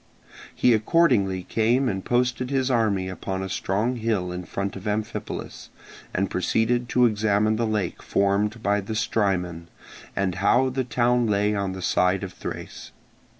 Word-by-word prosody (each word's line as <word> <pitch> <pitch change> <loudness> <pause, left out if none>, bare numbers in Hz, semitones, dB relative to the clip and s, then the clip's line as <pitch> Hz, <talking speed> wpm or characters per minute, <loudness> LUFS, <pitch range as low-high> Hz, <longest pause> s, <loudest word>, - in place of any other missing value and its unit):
He 125 - +4
accordingly 110 - +2
came 120 +7 +1
and 95 -4 -2
posted 125 +1 0
his 135 -1 +1
army 105 -6 +1
upon 95 0 -4
a 95 - -4
strong 105 +7 -1
hill 110 -6 -1
in 90 0 -5
front 100 +2 -4
of 95 +2 -7
Amphipolis, 105 +1 -4 0.4
and 100 +1 0
proceeded 115 +6 0
to 125 -1 +4
examine 110 -1 +2
the 115 0 0
lake 105 -5 -2
formed 105 +3 0
by 100 0 +2
the 110 +3 -5
Strymon, 90 -6 -1 0.5
and 95 -2 0
how 125 +6 +4
the 130 +1 -1
town 120 -1 +1
lay 105 0 +2
on 100 -2 -2
the 95 -1 -7
side 90 +2 +2
of 95 -2 -6
Thrace. - - -7
105 Hz, 155 wpm, -24 LUFS, 95-120 Hz, 0.5 s, He